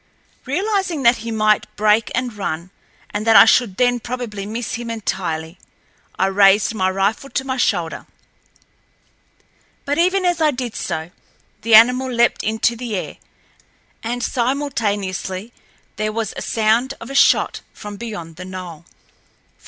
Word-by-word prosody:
Realizing 370 0 -1
that 235 0 +5
he 230 +1 -7
might 215 -1 +2
break 210 +1 +2
and 245 -2 -2
run 175 -3 -4 0.4
and 210 +2 -3
that 225 - +5
I - - +10
should 225 -4 +3
then 245 -1 +2
probably 230 -5 -5
miss 225 +2 -4
him 235 0 -4
entirely, 175 -6 -4 0.6
I 190 - +2
raised 195 +2 +4
my 190 -3 +1
rifle 195 +8 -1
to 265 - -2
my 260 -1 -2
shoulder. 170 -9 -1 1.8
But 285 +3 -1
even 370 +2 +2
as 350 -2 +1
I 310 - +4
did 250 -4 -4
so 160 +2 -4 0.5
the 225 0 +5
animal 250 +3 +6
leaped 235 0 +2
into 220 +2 +1
the 235 -2 -4
air, 185 - -5 0.8
and 240 +2 -3
simultaneously 225 -7 -2 0.4
there 215 0 -1
was 220 -1 -3
a - - -5
sound 230 +5 +1
of - - -9
a - - -5
shot 275 - +3
from 205 -1 -9
beyond 175 -8 -7
the 185 - -8
knoll. 180 -4 -8
225 Hz, 145 wpm, -20 LUFS, 195-250 Hz, 1.8 s, I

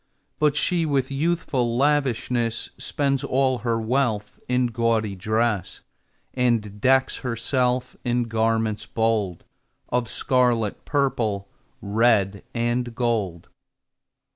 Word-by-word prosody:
But 150 -1 +3
she, 170 +3 +2
with 140 -4 0
youthful 135 -5 0
lavishness, 125 -4 0
Spends 140 -2 -1
all 130 -1 +1
her 115 -1 0
wealth 110 -3 -1
in 125 0 +2
gaudy 115 -3 0
dress, 110 0 -1 0.5
And 115 -5 0
decks 130 +2 +3
herself 125 +1 -1
in 120 0 +1
garments 110 -1 0
bold 110 -6 0 0.5
Of 120 -2 0
scarlet, 120 -4 +1
purple, 120 -9 0 0.3
red, 100 -2 +2
and 120 0 -1
gold. 105 -9 -1
120 Hz, 100 wpm, -24 LUFS, 110-130 Hz, 0.5 s, But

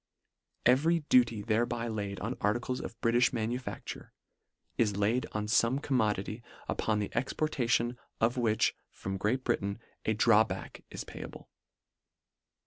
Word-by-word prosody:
Every 160 +7 +4
duty 115 -4 +4
thereby 115 +1 0
laid 100 -3 -3
on 115 +4 -2
articles 120 +5 0
of 115 - -8
Britifli 120 +2 +3
manufacture, 120 +2 -4 0.6
is 105 -2 +1
laid 110 +5 +1
on 105 0 -1
fome 115 +4 +3
com 135 - 0
modity 105 0 0 0.3
upon 110 -1 0
the 105 -1 -3
exportation 120 -2 0 0.2
of 115 +3 +2
which 115 -4 +2 0.2
from 95 0 -5
Great 120 +7 0
Britain, 100 -4 0 0.3
a 110 - +2
drawback 110 0 +2
is - - -6
payable. - - -9
115 Hz, 130 wpm, -31 LUFS, 105-125 Hz, 0.6 s, Every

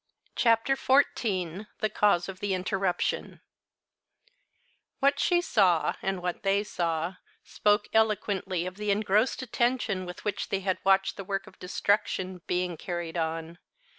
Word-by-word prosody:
CHAPTER 230 +3 +3
XIV 210 - +1
THE 215 - +1
CAUSE 200 -5 +3
OF 190 -1 -7
THE 200 -2 0
INTERRUPTION 185 -1 -1 1.6
What 280 +1 +3
she 350 -1 +3
saw, 180 - +3
and 190 -2 -2
what 180 -1 -2
they 200 +1 +2
saw, 170 -2 -2 0.3
spoke 205 0 +1
eloquently 200 -5 +1
of 185 +1 -6
the 210 0 -3
engrossed 210 +5 +2
attention 235 -6 0
with 180 - -9
which 205 -1 -2
they 195 - -1
had 190 -1 -1
watched 195 0 +3
the 195 - -5
work 195 +1 -3
of - - -16
destruction 185 -1 -1
being 180 -1 -1
carried 175 -2 -5
on. 165 0 -3
195 Hz, 135 wpm, -28 LUFS, 180-210 Hz, 1.6 s, CHAPTER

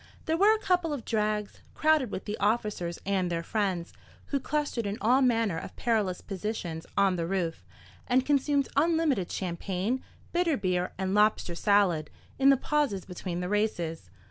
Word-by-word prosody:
There 320 - +1
were 410 +5 +5
a - - -4
couple 360 -5 +1
of 270 -6 -5
drags, 210 -2 -1
crowded 310 -5 +3
with 185 - -5
the 210 - -3
officers 205 -5 0
and 190 -2 0
their 170 -1 -2
friends, 190 -4 -1 0.4
who 280 - 0
clustered 285 -6 -2
in 200 +1 -3
all 250 +4 +4
manner 225 -9 +2
of - - -9
perilous 215 -7 0
positions 190 -5 -4
on 195 -2 +3
the 165 -1 -2
roof, 175 -3 -2 0.4
and 255 +1 +3
consumed 285 -1 +2
unlimited 310 - +2
champagne, 190 +6 -2 0.3
bitter 345 -4 +1
beer, 180 -3 0
and 190 0 -1
lobster 210 -4 +3
salad, 180 -5 +2 0.3
in 270 0 +6
the 275 - +6
pauses 275 - 0
between 180 -1 -5
the 180 - -2
races. 175 - -1
210 Hz, 165 wpm, -28 LUFS, 180-270 Hz, 0.4 s, in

